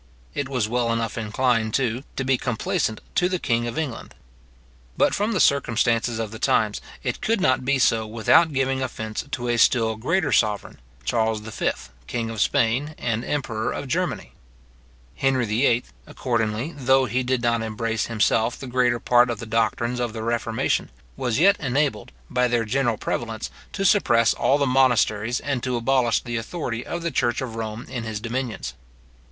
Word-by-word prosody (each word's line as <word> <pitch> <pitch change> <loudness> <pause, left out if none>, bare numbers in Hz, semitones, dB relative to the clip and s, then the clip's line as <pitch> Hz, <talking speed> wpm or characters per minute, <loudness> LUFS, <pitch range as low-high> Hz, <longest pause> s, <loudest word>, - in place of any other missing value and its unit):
It 140 -1 -3
was 125 -6 0
well 120 0 0
enough 115 -1 -1
inclined, 115 0 0
too, 125 -2 0
to 135 - -2
be 135 0 +2
complaisant 125 - -1
to 180 - +2
the 185 - 0
king 120 -7 0
of 120 - -5
England. 145 -8 -4 0.8
But - - +3
from 210 +3 0
the 195 - 0
circumstances 120 -4 +2
of 110 -2 -3
the 110 - -8
times, 105 -2 +1 0.2
it - - -3
could 225 0 +1
not 130 -6 +2
be 140 +2 +2
so 115 -3 +2
without 120 +9 +4
giving 135 -1 0
offence 110 -4 -4
to 125 0 -3
a 120 0 +1
still 115 -1 +3
greater 160 +8 0
sovereign, 105 -2 +1 0.2
Charles 110 - 0
V., 110 0 -2 0.4
king 115 -2 -3
of 110 -2 -3
Spain 140 +3 +1
and 115 -1 -2
emperor 120 -6 -2
of 140 - -5
Germany. 125 - -2 0.8
Henry 130 -2 +2
VIII., 115 +2 +2 0.2
accordingly, 115 +4 -2
though 135 -1 +3
he 130 +1 0
did 125 -1 -1
not 115 -1 +2
embrace 110 0 -2
himself 115 +1 +1
the - - -8
greater 125 -1 +1
part 120 +1 +4
of 120 - -2
the 115 - -7
doctrines 115 +2 0
of 120 -2 -2
the 110 -1 -5
reformation, 115 -1 0 0.3
was 120 -3 -1
yet 195 +5 +5
enabled, 135 -2 -1 0.2
by 125 0 +1
their 120 -1 +1
general 120 0 0
prevalence, 115 0 -3 0.2
to 195 - -2
suppress 120 - +4
all 140 - +2
the 140 - +1
monasteries, 125 -3 +2
and 140 -4 -2
to 125 0 -1
abolish 120 -1 +2
the 120 -1 -3
authority 120 -1 -4
of 170 - -5
the 170 - -1
church 120 -3 +1
of 130 -4 -4
Rome 115 +1 -5
in 120 - -5
his 110 -2 -4
dominions. 120 +1 -4
120 Hz, 175 wpm, -24 LUFS, 115-130 Hz, 0.8 s, yet